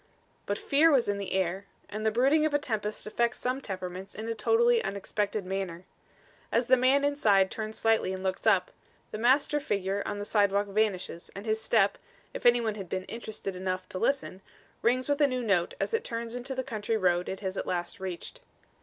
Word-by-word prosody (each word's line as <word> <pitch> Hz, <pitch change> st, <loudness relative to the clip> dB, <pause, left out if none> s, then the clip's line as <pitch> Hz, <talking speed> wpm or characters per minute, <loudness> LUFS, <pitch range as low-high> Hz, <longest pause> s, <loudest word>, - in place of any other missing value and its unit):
But 205 Hz, -, 0 dB
fear 300 Hz, +4 st, +4 dB
was 270 Hz, -6 st, +3 dB
in 205 Hz, 0 st, 0 dB
the 200 Hz, -, -4 dB
air, 190 Hz, +1 st, 0 dB, 0.2 s
and 215 Hz, +1 st, -5 dB
the 220 Hz, -, +3 dB
brooding 270 Hz, +8 st, +3 dB
of 310 Hz, -2 st, +1 dB
a -, -, +6 dB
tempest 215 Hz, -7 st, -3 dB
affects 235 Hz, +2 st, 0 dB
some 255 Hz, +2 st, -2 dB
temperaments 185 Hz, -2 st, -6 dB
in 220 Hz, +1 st, -5 dB
a 230 Hz, -, -1 dB
totally 465 Hz, -, +3 dB
unexpected 200 Hz, +1 st, -2 dB
manner. 185 Hz, -2 st, -4 dB, 0.7 s
As 235 Hz, +2 st, +2 dB
the 255 Hz, -, +6 dB
man 265 Hz, +3 st, +3 dB
inside 210 Hz, -10 st, +3 dB
turns 220 Hz, 0 st, -5 dB
slightly 225 Hz, -4 st, +2 dB
and 190 Hz, 0 st, -5 dB
looks 190 Hz, +3 st, -2 dB
up, 190 Hz, -4 st, +4 dB, 0.4 s
the 215 Hz, -, -5 dB
master 270 Hz, +5 st, +3 dB
figure 200 Hz, -6 st, -1 dB
on 205 Hz, -, -3 dB
the 205 Hz, -, -4 dB
sidewalk 205 Hz, -1 st, +2 dB
vanishes, 200 Hz, -4 st, -1 dB
and 200 Hz, +2 st, -7 dB
his 220 Hz, 0 st, 0 dB
step, 205 Hz, -4 st, +2 dB, 0.3 s
if -, -, +1 dB
any 240 Hz, 0 st, +6 dB
one 220 Hz, -2 st, -1 dB
had 195 Hz, -4 st, -8 dB
been 185 Hz, 0 st, -2 dB
interested 215 Hz, -3 st, -6 dB
enough 185 Hz, 0 st, -3 dB
to 185 Hz, -, -5 dB
listen, 265 Hz, -8 st, -1 dB, 0.4 s
rings 255 Hz, +2 st, +2 dB
with 290 Hz, +1 st, +1 dB
a 290 Hz, -, +6 dB
new 255 Hz, -2 st, -2 dB
note 195 Hz, -6 st, +1 dB
as -, -, -2 dB
it 455 Hz, -, +1 dB
turns 230 Hz, 0 st, -4 dB
into 250 Hz, +2 st, -4 dB
the 260 Hz, -, -2 dB
country 225 Hz, -3 st, -2 dB
road 180 Hz, -3 st, +1 dB
it 190 Hz, -, -5 dB
has 190 Hz, -1 st, -3 dB
at -, -, -3 dB
last 175 Hz, 0 st, -3 dB
reached. 185 Hz, -2 st, -6 dB
215 Hz, 205 wpm, -29 LUFS, 190-245 Hz, 0.7 s, a